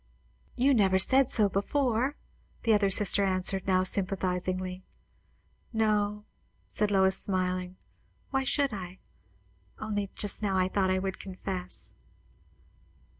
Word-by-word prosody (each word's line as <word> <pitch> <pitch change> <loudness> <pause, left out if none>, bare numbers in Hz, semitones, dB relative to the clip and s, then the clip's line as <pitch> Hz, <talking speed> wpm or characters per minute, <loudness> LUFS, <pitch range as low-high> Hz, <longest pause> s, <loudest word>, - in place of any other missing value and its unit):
"You 270 +3 +3
never 195 -5 +3
said 260 +7 +3
so 215 -3 +4
before," 245 +6 0 0.5
the 230 - +3
other 205 -2 +3
sister 200 0 +4
answered, 190 0 0
now 185 -1 +3
sympathizingly. 185 -1 0 0.9
"No," 210 -2 0 0.4
said 210 -1 0
Lois, 190 -1 +4
smiling; 185 -1 -1 0.6
"why 270 -1 0
should 275 -1 0
I? 185 -2 -7 0.8
Only 205 -2 -3
just 205 +1 0
now 195 -3 0
I 185 0 +2
thought 190 -1 +1
I 185 - +2
would 190 0 -3
confess." 185 -1 -5
195 Hz, 120 wpm, -28 LUFS, 185-215 Hz, 0.9 s, so